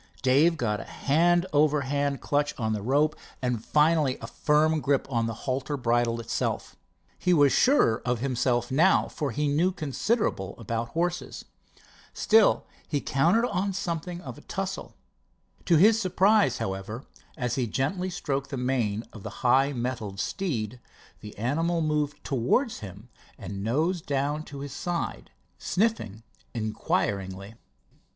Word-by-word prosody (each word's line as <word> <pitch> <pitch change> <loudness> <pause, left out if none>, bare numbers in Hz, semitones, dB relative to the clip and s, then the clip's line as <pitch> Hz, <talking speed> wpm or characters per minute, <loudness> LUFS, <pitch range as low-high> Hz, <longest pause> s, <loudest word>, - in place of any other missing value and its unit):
Dave 145 +6 +4
got 105 -6 -1
a - - -6
hand 175 +5 +2
over 150 0 +3
hand 140 +1 -1
clutch 145 0 0
on 110 -2 -1
the 105 - -2
rope 145 +7 +2 0.2
and 125 -3 -2
finally 150 -2 +3
a - - -7
firm 150 +5 +2
grip 140 0 +1
on 115 -2 +1
the 115 - -4
halter 135 +2 -2
bridle 120 -1 +1
itself. 115 - -3 0.4
He 180 -1 +3
was 145 -3 +5
surer 255 - +4
of 125 0 0
himself 125 -1 0
now, 165 +8 +4
for 145 -3 -3
he 145 +5 -1
knew 160 +6 +2
considerable 155 - -1
about 115 +1 -3
horses. 175 +1 -2 0.7
Still 220 -1 +4 0.2
he 145 - 0
counted 170 - +2
on 195 -1 -1
something 175 -1 -4
of 135 -1 -8
a - - -15
tussle. 195 +3 -5 0.7
To 170 - +4
his 215 +6 +5
surprise, 190 - +3
however, 95 +6 -5 0.3
as 125 -4 -1
he 125 -2 0
gently 165 - -1
stroked 140 -6 -3
the 135 - -4
mane 120 -4 0
of 110 - -10
the - - -6 0.2
high 135 +3 +4
mettled 120 -6 -4
steed, 125 - -3 0.4
the 105 - -11
animal 165 +10 0
moved 150 -2 -1
toward 140 - +1
him 100 - -9 0.3
and 100 -1 -6
nosed 160 - 0
down 145 +2 0
to 140 -1 -8
his 140 -1 -6
side, 175 +2 -3 0.3
sniffing 180 - -1 0.3
inquiringly. 100 -2 -2
140 Hz, 145 wpm, -27 LUFS, 115-165 Hz, 0.7 s, was